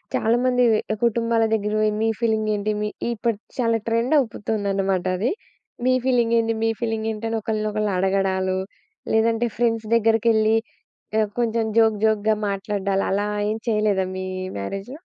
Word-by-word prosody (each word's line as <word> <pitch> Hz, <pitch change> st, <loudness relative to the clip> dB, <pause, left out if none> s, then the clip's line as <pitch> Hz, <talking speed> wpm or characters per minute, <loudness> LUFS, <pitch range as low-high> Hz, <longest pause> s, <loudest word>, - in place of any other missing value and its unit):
చాలా 230 Hz, +2 st, +2 dB
మందివి 245 Hz, -3 st, +3 dB, 0.2 s
కుటుంబాల 230 Hz, 0 st, +2 dB
దగ్గర 210 Hz, -1 st, 0 dB
పోయి 215 Hz, 0 st, +2 dB
మీ 225 Hz, -, +2 dB
ఫీలింగేంటి? 215 Hz, -2 st, 0 dB
మీ 210 Hz, -, 0 dB, 0.2 s
ఇప్పుడు 230 Hz, -1 st, -1 dB, 0.2 s
చాలా 230 Hz, -3 st, +2 dB
ట్రెండవుపుతుందనమాటది. 205 Hz, -, 0 dB, 0.6 s
మీ 255 Hz, -, +4 dB
ఫీలింగేంటి, 230 Hz, -3 st, +2 dB
మీ 225 Hz, -, +3 dB
ఫీలింగేంటని 225 Hz, -1 st, -2 dB
ఒకళ్ళని 215 Hz, 0 st, -2 dB
ఒకళ్ళు 210 Hz, -1 st, -1 dB
అడగడాలు, 190 Hz, 0 st, +1 dB, 0.6 s
లేదంటే 225 Hz, +1 st, +2 dB
ఫ్రెండ్స్ 225 Hz, -2 st, 0 dB
దెగ్గరికెళ్ళి 225 Hz, -1 st, +3 dB, 0.6 s
ఆహ్, 215 Hz, -, +1 dB
కొంచెం 230 Hz, -1 st, +1 dB
జోక్, 220 Hz, -1 st, +4 dB
జోక్‌గా 215 Hz, 0 st, +2 dB
మాట్లాడ్డాలు 195 Hz, 0 st, -1 dB
అలా 205 Hz, +2 st, 0 dB, 0.2 s
ఏం 220 Hz, -, -2 dB
చెయలేదా, 210 Hz, -3 st, +1 dB
మీ 185 Hz, 0 st, -4 dB, 0.3 s
మ్యారేజ్‌లో? 195 Hz, -, -5 dB
220 Hz, 125 wpm, -23 LUFS, 205-230 Hz, 0.6 s, మీ